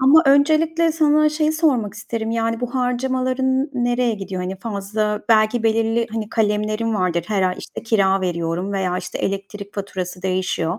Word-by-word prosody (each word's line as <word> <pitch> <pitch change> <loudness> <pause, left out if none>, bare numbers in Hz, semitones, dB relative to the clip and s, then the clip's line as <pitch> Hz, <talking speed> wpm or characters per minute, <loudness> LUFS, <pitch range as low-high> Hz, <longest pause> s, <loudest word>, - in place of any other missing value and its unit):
Ama 280 +5 +6
öncelikle 315 +4 +3
sana 305 -1 +4
şeyi 305 0 0
sormak 260 - +1
isterim; 220 +1 -4
yani, 230 0 -1
bu 245 0 -4
harcamaların 260 +1 0
n 290 - -4 0.2
nereye 240 -1 +1
gidiyor? 195 -2 -5
Hani, 185 +1 -4
fazla 210 0 -2
belki 220 +1 +3
belirli, 225 +1 +1
hani, 220 -1 -4
kalemlerin 215 +1 0
vardır 180 -3 0
her 205 -3 +1
ay, 185 -1 +1
işte, - - -8
kira 195 -4 +2
veriyorum 175 +1 -2
veya, 185 -2 -1
işte, 180 -1 -6
elektrik 200 +1 -4
faturası 185 -2 -5
değişiyor 185 -1 -1
220 Hz, 160 wpm, -21 LUFS, 195-255 Hz, 0.2 s, Ama